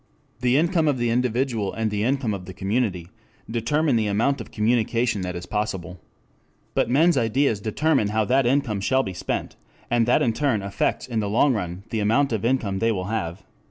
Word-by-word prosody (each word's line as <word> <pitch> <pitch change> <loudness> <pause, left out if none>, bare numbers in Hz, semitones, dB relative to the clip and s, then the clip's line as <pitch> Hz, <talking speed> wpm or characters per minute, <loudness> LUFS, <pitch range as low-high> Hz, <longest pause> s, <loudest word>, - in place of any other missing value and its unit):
The 125 +1 +2
income 165 0 +2
of 145 -3 +2
the 120 -1 0
individual, 120 -3 0
and 110 -1 -1
the 105 0 -1
income 130 -2 0
of 95 -2 -6
the 95 - -9
community 95 -4 -1 0.4
determine 120 +4 +1
the 110 -2 +1
amount 115 +6 +1
of - - -9
communication 115 0 +1
that 90 -1 -4
is 85 0 -6
possible. 95 -3 -3 0.7
But - - +1
men's 160 +5 +4
ideas 115 -2 +1
determine 135 +3 +1
how 110 +1 0
that 130 +2 +2
income 120 -6 +1
shall 130 +6 +2
be 95 - -5
spent, 90 - -4 0.3
and 120 -1 +3
that 120 - +3
in 115 - +1
turn 120 -6 0
affects 100 -1 -1
in 115 -3 -2
the 105 -2 -1
long 125 +6 +3
run 90 -3 -4
the 110 - -1
amount 115 +6 +2
of 110 - -2
income 115 -6 0
they 115 +2 +2
will 95 -2 -3
have. 95 -3 -3
115 Hz, 195 wpm, -24 LUFS, 100-130 Hz, 0.7 s, men's